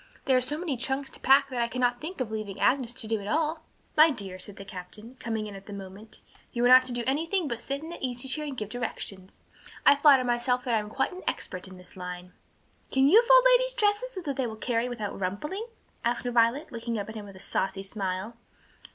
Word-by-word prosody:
There 265 Hz, -, +4 dB
are 255 Hz, -, +4 dB
so 275 Hz, +4 st, -3 dB
many 315 Hz, -6 st, -2 dB
trunks 265 Hz, +3 st, -3 dB
to -, -, -10 dB
pack 275 Hz, +1 st, +5 dB
that 245 Hz, -2 st, -1 dB
I 235 Hz, -, +1 dB
cannot 245 Hz, 0 st, 0 dB
think 335 Hz, +3 st, -6 dB
of 245 Hz, -4 st, -2 dB
leaving 215 Hz, -3 st, -5 dB
Agnes 255 Hz, -3 st, +2 dB
to 230 Hz, -, -1 dB
do 220 Hz, 0 st, 0 dB
it 200 Hz, -, -8 dB
all." 315 Hz, +4 st, 0 dB, 0.3 s
"My 310 Hz, +1 st, +8 dB
dear," 195 Hz, -9 st, -3 dB
said 200 Hz, +1 st, -7 dB
the 195 Hz, -, -10 dB
captain, 200 Hz, +6 st, -8 dB
coming 220 Hz, -2 st, -3 dB
in 210 Hz, -, -7 dB
at 195 Hz, 0 st, -12 dB
that 205 Hz, -, -7 dB
moment, 200 Hz, +2 st, -9 dB, 0.3 s
"you 240 Hz, 0 st, 0 dB
are -, -, +7 dB
not 255 Hz, +1 st, +8 dB
to 255 Hz, -, +1 dB
do 240 Hz, 0 st, -1 dB
anything 325 Hz, +6 st, 0 dB
but 235 Hz, -3 st, -4 dB
sit 275 Hz, +4 st, -4 dB
in 320 Hz, -, -7 dB
that -, -, -8 dB
easy 250 Hz, 0 st, -2 dB
chair 300 Hz, +3 st, 0 dB
and 280 Hz, -3 st, -5 dB
give 210 Hz, -3 st, -4 dB
directions. 210 Hz, -5 st, -5 dB, 0.4 s
I -, -, +8 dB
flatter 280 Hz, -2 st, +6 dB
myself 245 Hz, +1 st, +1 dB
that 245 Hz, -, -1 dB
I 225 Hz, -, +4 dB
am 210 Hz, 0 st, -6 dB
quite -, -, 0 dB
an 365 Hz, -, -8 dB
expert 185 Hz, +1 st, -3 dB
in 185 Hz, -1 st, -11 dB
this 180 Hz, -1 st, -14 dB
line." 180 Hz, 0 st, -7 dB, 0.6 s
"Can 270 Hz, 0 st, +4 dB
you 415 Hz, +10 st, +8 dB
fold -, -, +6 dB
ladies' -, -, +3 dB
dresses 430 Hz, +2 st, +1 dB
so 375 Hz, -, -5 dB
that 285 Hz, -5 st, -4 dB
they 260 Hz, -3 st, 0 dB
will 220 Hz, -, -6 dB
carry 235 Hz, +2 st, -1 dB
without 220 Hz, -5 st, -5 dB
rumpling?" 300 Hz, -, -3 dB, 0.4 s
asked 240 Hz, +1 st, 0 dB
Violet, 240 Hz, +4 st, +2 dB
looking 235 Hz, -1 st, -3 dB
up 205 Hz, -, -3 dB
at 220 Hz, -, -7 dB
him 215 Hz, -2 st, -7 dB
with 200 Hz, -1 st, -12 dB
a -, -, -12 dB
saucy 195 Hz, 0 st, -1 dB
smile. 195 Hz, +2 st, -4 dB
245 Hz, 245 wpm, -28 LUFS, 210-280 Hz, 0.6 s, My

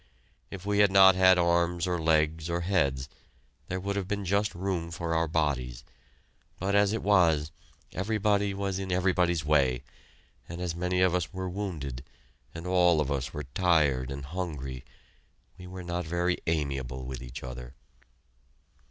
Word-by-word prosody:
If 95 Hz, 0 st, -8 dB
we 100 Hz, 0 st, +1 dB
had 100 Hz, -1 st, +5 dB
not 95 Hz, -1 st, +8 dB
had 95 Hz, 0 st, +5 dB
arms 85 Hz, 0 st, +2 dB
or 90 Hz, -2 st, -1 dB
legs 80 Hz, 0 st, +1 dB
or 85 Hz, +1 st, -1 dB
heads, 70 Hz, -8 st, 0 dB, 0.6 s
there 95 Hz, -, -3 dB
would 100 Hz, +2 st, -3 dB
have 100 Hz, -2 st, -2 dB
been 100 Hz, -1 st, -3 dB
just 100 Hz, +2 st, 0 dB
room 90 Hz, -2 st, -2 dB
for 85 Hz, 0 st, -3 dB
our 80 Hz, 0 st, +1 dB
bodies, 70 Hz, -6 st, -1 dB, 0.7 s
but 95 Hz, +2 st, -2 dB
as 100 Hz, 0 st, +4 dB
it 110 Hz, -, -2 dB
was, 80 Hz, -7 st, +3 dB, 0.4 s
everybody 100 Hz, 0 st, 0 dB
was 95 Hz, -1 st, -2 dB
in 95 Hz, -1 st, -4 dB
everybody's 90 Hz, -3 st, +1 dB
way, 70 Hz, -4 st, +2 dB, 0.7 s
and 85 Hz, +1 st, -6 dB
as 90 Hz, -2 st, -2 dB
many 90 Hz, +1 st, 0 dB
of 90 Hz, -1 st, +4 dB
us 90 Hz, -4 st, -1 dB
were 95 Hz, -1 st, -4 dB
wounded, 80 Hz, -10 st, -5 dB, 0.5 s
and 85 Hz, +1 st, -7 dB
all 90 Hz, -3 st, +4 dB
of 75 Hz, -2 st, -1 dB
us 70 Hz, +1 st, -2 dB
were 75 Hz, -, -5 dB
tired 75 Hz, -8 st, +2 dB
and 70 Hz, 0 st, -6 dB
hungry, 70 Hz, -6 st, -5 dB, 0.8 s
we 90 Hz, -, -9 dB
were 90 Hz, 0 st, -8 dB
not 85 Hz, 0 st, -3 dB
very 85 Hz, +2 st, 0 dB
amiable 70 Hz, -5 st, -2 dB
with 65 Hz, -1 st, -6 dB
each 60 Hz, +1 st, -8 dB
other. 60 Hz, +1 st, -8 dB
85 Hz, 160 wpm, -28 LUFS, 75-95 Hz, 0.8 s, not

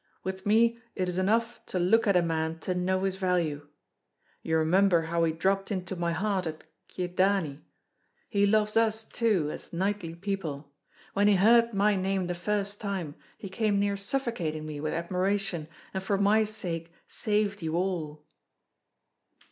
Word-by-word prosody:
With 190 Hz, +1 st, -5 dB
me 230 Hz, +2 st, +4 dB, 0.2 s
it 185 Hz, -, -1 dB
is 180 Hz, +1 st, -2 dB
enough 230 Hz, +5 st, +1 dB
to -, -, -3 dB
look 210 Hz, +6 st, +3 dB
at 200 Hz, -2 st, +5 dB
a 175 Hz, -, +3 dB
man 160 Hz, -1 st, -1 dB
to 185 Hz, -, -1 dB
know 185 Hz, +1 st, 0 dB
his 190 Hz, -1 st, -1 dB
value. 170 Hz, -6 st, 0 dB, 0.7 s
You 160 Hz, 0 st, 0 dB
remember 175 Hz, +2 st, +4 dB
how 170 Hz, +1 st, 0 dB
he 160 Hz, -, +1 dB
dropped 195 Hz, +4 st, 0 dB
into 185 Hz, -1 st, -3 dB
my 170 Hz, -1 st, -1 dB
heart 190 Hz, +1 st, -1 dB
at 155 Hz, 0 st, -6 dB, 0.2 s
Kyedani? 180 Hz, -4 st, 0 dB, 0.7 s
He 200 Hz, -2 st, +2 dB
loves 210 Hz, 0 st, +2 dB
us, 220 Hz, -1 st, +2 dB
too, 205 Hz, -11 st, +1 dB
as -, -, -9 dB
knightly 185 Hz, -1 st, -2 dB
people. 170 Hz, -7 st, -4 dB, 0.4 s
When 200 Hz, +1 st, +3 dB
he 205 Hz, -, +5 dB
heard 230 Hz, +3 st, +5 dB
my 205 Hz, +1 st, +3 dB
name 190 Hz, 0 st, 0 dB
the 175 Hz, -, -2 dB
first 205 Hz, +3 st, -2 dB
time, 190 Hz, -8 st, -3 dB, 0.2 s
he 200 Hz, -, -7 dB
came 205 Hz, +1 st, 0 dB
near 200 Hz, 0 st, +1 dB
suffocating 200 Hz, -, -2 dB
me 150 Hz, -1 st, -6 dB
with 155 Hz, +1 st, -2 dB
admiration, 180 Hz, 0 st, -1 dB, 0.3 s
and 190 Hz, -, -2 dB
for 195 Hz, +1 st, 0 dB
my 210 Hz, +2 st, +4 dB
sake 170 Hz, -6 st, -5 dB, 0.2 s
saved 210 Hz, -2 st, -1 dB
you 160 Hz, 0 st, -2 dB
all." 165 Hz, -5 st, -2 dB
190 Hz, 165 wpm, -28 LUFS, 170-205 Hz, 0.7 s, at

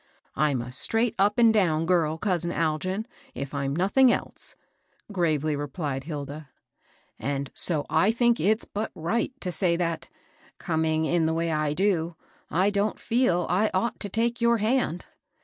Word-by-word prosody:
" -, -, -39 dB
I'm 135 Hz, -5 st, 0 dB
a 125 Hz, -, -8 dB
straight 225 Hz, -, +1 dB
up 205 Hz, +2 st, +3 dB
and 230 Hz, -2 st, +6 dB
down 165 Hz, -6 st, +2 dB
girl, 165 Hz, -3 st, +2 dB
cousin 175 Hz, -2 st, -1 dB
Algin, 175 Hz, +6 st, -1 dB, 0.3 s
if 140 Hz, +1 st, -5 dB
I'm 140 Hz, 0 st, -2 dB
nothing 220 Hz, +9 st, +4 dB
else," -, -, -4 dB, 0.6 s
gravely 155 Hz, -5 st, +1 dB
replied 145 Hz, -1 st, -4 dB
Hilda; 150 Hz, -1 st, -6 dB, 0.4 s
" -, -, -34 dB, 0.3 s
and 140 Hz, 0 st, -3 dB
so 155 Hz, -5 st, 0 dB
I 160 Hz, +6 st, +3 dB
think 235 Hz, +1 st, +2 dB
it's 215 Hz, +3 st, +2 dB
but 215 Hz, +2 st, -4 dB
right 220 Hz, +11 st, -1 dB
to 180 Hz, -, -2 dB
say 170 Hz, +1 st, +2 dB
that, 170 Hz, -1 st, -2 dB, 0.5 s
coming 160 Hz, -2 st, 0 dB
in 165 Hz, 0 st, +2 dB
the 160 Hz, -, 0 dB
way 165 Hz, 0 st, 0 dB
I 155 Hz, -1 st, 0 dB
do, 175 Hz, -2 st, 0 dB, 0.3 s
I 190 Hz, +4 st, +2 dB
don't 205 Hz, +1 st, 0 dB
feel 225 Hz, -8 st, +1 dB
I 205 Hz, +4 st, +2 dB
ought 220 Hz, +5 st, 0 dB
to 205 Hz, -, -4 dB
take 230 Hz, +3 st, 0 dB
your 235 Hz, 0 st, +4 dB
hand. 220 Hz, -5 st, 0 dB
175 Hz, 165 wpm, -26 LUFS, 155-210 Hz, 0.6 s, and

